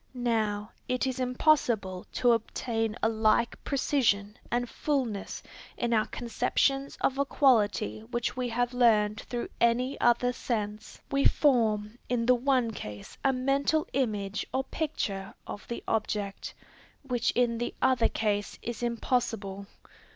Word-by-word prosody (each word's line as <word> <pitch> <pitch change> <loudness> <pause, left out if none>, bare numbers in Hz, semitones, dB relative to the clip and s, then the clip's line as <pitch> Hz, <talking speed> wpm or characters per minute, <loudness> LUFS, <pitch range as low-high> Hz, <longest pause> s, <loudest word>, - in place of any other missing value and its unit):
Now, 220 -3 -1 0.2
it 250 +1 +1
is 260 0 -2
impossible 245 -8 +1
to 245 - +3
obtain 225 -1 -1
a - - +5
like 220 +1 +1
precision 225 -7 +1
and 245 +1 0
fulness 245 -6 -2 0.3
in 240 -1 0
our 215 -1 +2
conceptions 270 +3 0
of 270 +1 +1
a - - +4
quality 215 - +2
which 240 - -2
we 250 -1 -2
have 245 +1 0
learned 215 -4 +3
through 240 -1 -4
any 245 +3 +2
other 240 +1 +3
sense. 215 -4 -4
We 275 0 +2
form 225 -5 +2
in 235 -1 +1
the 250 - +6
one 250 -2 +2
case 105 - -8
a 270 - +4
mental 275 +4 +1
image 210 -6 -1
or 265 - 0
picture 205 -11 -3
of 205 - -8
the 235 - -5
object, 210 -2 -2 0.5
which 245 -3 0
in 235 -2 +2
the 240 - -3
other 255 -3 +3
case 205 -2 -1
is 235 0 -4
impossible. 225 -4 -1
235 Hz, 135 wpm, -29 LUFS, 215-255 Hz, 0.5 s, the